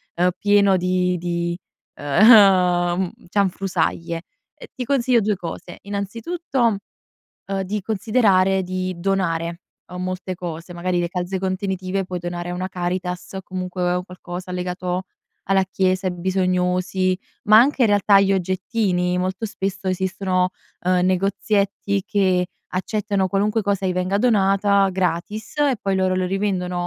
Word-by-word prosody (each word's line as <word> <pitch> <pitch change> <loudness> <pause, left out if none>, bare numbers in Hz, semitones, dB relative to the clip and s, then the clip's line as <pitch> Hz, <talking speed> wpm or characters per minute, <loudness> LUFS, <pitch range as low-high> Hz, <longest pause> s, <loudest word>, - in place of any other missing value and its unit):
uhm, 180 +1 +3
pieno 200 -2 +4
di 180 0 +1
di 170 0 -2 0.4
uhm, 180 - +5 0.2
cianfrusaglie. 180 -4 -1 0.3
Ehm, - - -12
ti 250 - -4
consiglio 255 -2 +2
due 210 0 +1
cose, 175 0 -7
innanzitutto, 230 - -1 0.8
uhm, 195 0 0
di 205 +2 -3
considerare 195 -3 +2
di 185 0 -3
donare, 170 -2 -1 0.3
uhm, 180 0 -6
molte 185 0 -4
cose, 170 0 -7
magari 180 +1 -1
le 175 - -1
calze 180 +1 -3
contenitive, 190 0 -2
puoi 180 -1 -4
donare 175 0 -4
a - - -3
una 185 +1 -3
Caritas, 180 +1 -4
comunque 180 -1 -2
un 180 - -3
qualcosa 180 0 -8
legato 180 0 -3 0.5
alla 195 0 +4
chiesa, 185 +1 +1
ai 180 - -4
bisognosi, 185 0 0 0.3
ma 215 +1 +7
anche 265 +3 +4
in 230 - +5
realtà 205 -1 +5
gli 195 0 +3
oggettini, 185 -1 0
molto 185 +4 -2
spesso 195 -2 -4
esistono, 185 0 0 0.4
uhm, 180 0 +3
negozietti 200 +1 0
che 190 -4 +2 0.3
accettano 200 0 -1
qualunque 210 +3 +1
cosa 200 -1 0
gli 185 - +1
venga 185 +2 0
donata 200 -3 +3
gratis, 190 - -3
e 285 -3 +3
poi 195 -1 0
loro 185 0 +1
lo 185 - 0
rivendono, 180 -2 -1
185 Hz, 135 wpm, -22 LUFS, 180-200 Hz, 0.8 s, ma